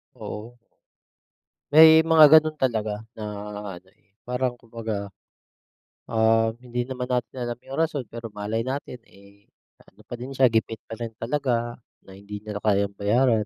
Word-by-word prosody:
Oo. 115 +3 -8 1.2
May 160 +1 +8
mga 160 -1 +7
gano'n 155 -1 +2
talaga 110 -5 -1 0.2
na 110 - -6 0.6
ano, 95 - -29
eh, 90 - -38 0.2
parang 125 -1 -2
kumbaga, 110 -3 -5 1.0
um, 115 0 +3 0.2
hindi 120 0 -2
naman 125 0 -4
natin 125 0 -2
alam 120 0 -5
yung 135 - -8
rason 155 -6 -1
pero 115 -2 -8
malay 105 +3 -3
natin, 130 -1 -4
eh, 100 0 -20 0.4
ano 100 - -21
pa 120 +3 -8
din 130 +3 -7
siya 130 -2 +4
gipit 110 -1 -1
pa 115 - -6
rin 115 -1 -6
talaga 120 -2 -1 0.2
na 95 0 -14
hindi 100 +1 -8
niya 105 -1 -6
na 105 - -10
kayang 100 -1 +1
bayaran. 110 +1 +2
115 Hz, 155 wpm, -25 LUFS, 105-130 Hz, 1.2 s, May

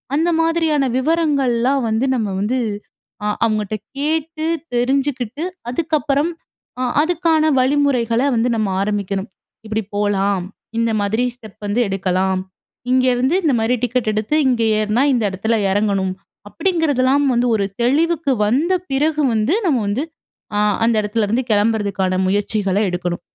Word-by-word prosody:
அந்த 330 +3 +2
மாதிரியான 325 -4 +1
விவரங்கள்லாம் 275 -4 +1
வந்து 220 +4 +1
நம்ம 220 -4 -1
வந்து 250 +5 0 0.7
அ - - +1 0.2
அவங்கட்ட 215 -2 -1 0.2
கேட்டு 315 +2 -2 0.3
தெரிஞ்சுக்கிட்டு 265 +2 -1 0.3
அதுக்கப்பறம் 305 +1 0 0.5
அ - - +1 0.2
அதுக்கான 320 -2 +2
வழிமுறைகள 255 -4 +2
வந்து 235 +2 +1
நம்ம 215 -2 0
ஆரம்பிக்கணும். 200 -1 -2 0.4
இப்படி 220 0 -2
போலாம். 200 -2 0 0.3
இந்த 230 0 +1
மாதிரி 215 +4 0
ஸ்டெப் 220 -5 -15
வந்து 215 +4 +1
எடுக்கலாம். 190 0 0 0.5
இங்கேருந்து 255 +3 +2
இந்த 300 - +2
மாரி 225 +3 +1
டிக்கெட் 245 -2 0
எடுத்து 215 +7 -1
இங்க 245 -3 +2 0.2
ஏறினா 215 +4 +1
இந்த 240 -3 +1
இடத்தில 220 +4 0
இறங்கணும். 195 -2 0 0.4
அப்படிங்கிறதெல்லாம் 285 - +1
வந்து 240 +1 +2
ஒரு 200 -2 0 0.2
தெளிவுக்கு 310 +3 +2 0.2
வந்த 295 - +2 0.2
பிறகு 300 +3 +1
வந்து 225 - +1
நம்ம 265 -8 +2
வந்து 220 +8 -1 0.5
அ - - +2 0.3
அந்த 230 0 +2
இடத்துலேருந்து 220 +3 0
கிளம்புறதுக்கான 205 -3 +1
முயற்சிகளை 205 0 0
எடுக்கணும். 175 -1 -3
240 Hz, 125 wpm, -19 LUFS, 210-285 Hz, 0.7 s, அந்த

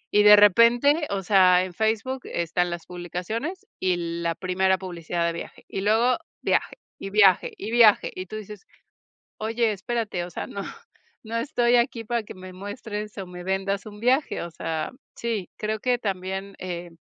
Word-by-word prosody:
y 210 - +7
de 210 0 +9
repente, 235 - +5
o 195 -1 -2
sea, 185 -2 +5
en 185 -1 -6
Facebook 220 +6 -1
están 175 +1 -1
las 170 -1 -6
publicaciones 215 - -5
y 185 -1 +1 0.3
la 170 -1 -1
primera 190 +1 +1
publicidad 175 -2 -3
de 170 - 0
viaje, 170 - -8
y - - -4
luego 225 +5 +3 0.2
viaje, - - 0 0.2
y 195 - -5
viaje, 195 -3 +4
y 215 +3 -5
viaje, 230 -3 +5
y 185 - -6
tú 215 - -8
dices: 210 -2 -9 0.7
"Oye, 225 +1 0
espérate", 210 -3 -3
o 180 - -8
sea, - - -5
"no, 200 - -6 0.6
no 225 +1 -4
estoy 245 -2 +2
aquí 235 -1 0
para 235 +1 -1
que 210 - -10
me 185 0 -10
muestres 210 +2 -6
o 190 - -5
me 180 0 -9
vendas 195 +1 -1
un 210 -1 -10
viaje", 260 +5 +1
o 170 - -6
sea, 160 -1 -3 0.2
sí, 225 -6 -3
creo 215 0 -3
que 250 +1 +2
también, 195 -1 -4
eh 175 -1 -6
200 Hz, 175 wpm, -25 LUFS, 185-230 Hz, 0.7 s, de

